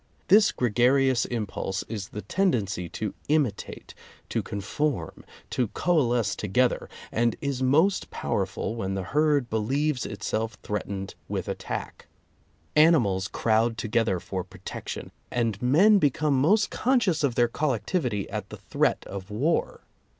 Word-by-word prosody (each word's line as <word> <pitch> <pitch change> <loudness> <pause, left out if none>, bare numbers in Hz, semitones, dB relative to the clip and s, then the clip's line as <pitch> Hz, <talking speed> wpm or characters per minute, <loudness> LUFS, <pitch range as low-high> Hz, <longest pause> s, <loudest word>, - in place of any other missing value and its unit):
This 210 +2 +6
gregarious 125 +2 +3
impulse 100 -4 -3
is 105 -4 -5
the 105 - -7
tendency 100 - 0
to 110 +5 -4 0.2
imitate, 145 -10 -1 0.4
to - - 0
conform, 105 - -3 0.3
to 125 - +1
coalesce 120 - +1
together, 125 +5 0 0.2
and 115 0 +1
is 140 -2 -2
most 160 +9 +3
powerful - - -2
when 95 -4 -2
the 95 - -2
herd 145 +3 +2
believes 130 +6 0
itself 110 +1 -3
threatened 100 -2 -4 0.2
with - - -3
attack. - - -5 0.7
Animals 120 - +4
crowd 115 +1 +1
together 110 -5 0
for 95 +1 -4
protection, 95 +1 -7 0.2
and 115 -4 -1
men 185 +12 +5
become 145 -1 +2
most 185 +10 +3
conscious 225 - +1
of 130 -5 +1
their 120 -1 +4
collectivity 125 - -1
at - - -4
the - - -8
threat - - 0
of 95 +1 -7
war. 140 +11 0
120 Hz, 130 wpm, -26 LUFS, 105-150 Hz, 0.7 s, This